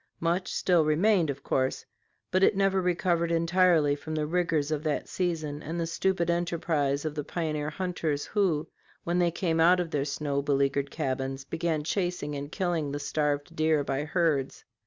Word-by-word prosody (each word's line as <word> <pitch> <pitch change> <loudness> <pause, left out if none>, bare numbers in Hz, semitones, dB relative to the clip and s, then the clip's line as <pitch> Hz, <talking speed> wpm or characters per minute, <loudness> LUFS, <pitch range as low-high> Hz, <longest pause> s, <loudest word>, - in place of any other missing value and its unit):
Much 175 +3 0
still 175 -3 +3
remained, 170 +3 +3
of 140 0 -4
course, 130 0 -1 0.5
but 185 - +2
it 195 +1 +4
never 195 -1 +2
recovered 175 -1 +1
entirely 170 -3 +3
from 155 +2 -6
the 155 -1 0
rigors 160 -2 0
of 150 -2 -1
that 155 -1 -2
season 155 -5 -2
and 165 +3 -4
the 165 - 0
stupid 175 +1 0
enterprise 165 -4 0
of 155 - -2
the 150 -1 -3
pioneer 155 -2 -2
hunters, 160 -4 -2
who, 180 -8 0 0.4
when 175 +1 0
they 175 -1 +3
came 165 -1 -1
out 175 +3 +5
of 170 -2 -2
their 145 -2 0
snow 140 0 -2
beleaguered 140 0 +1
cabins, 135 -2 -3
began 165 0 -1
chasing 175 -3 -2
and 145 +1 -6
killing 170 -6 -1
the 145 - -3
starved 145 +2 -1
deer 155 -2 +2
by 140 +1 -2
herds. 155 -4 0
160 Hz, 175 wpm, -28 LUFS, 145-175 Hz, 0.5 s, out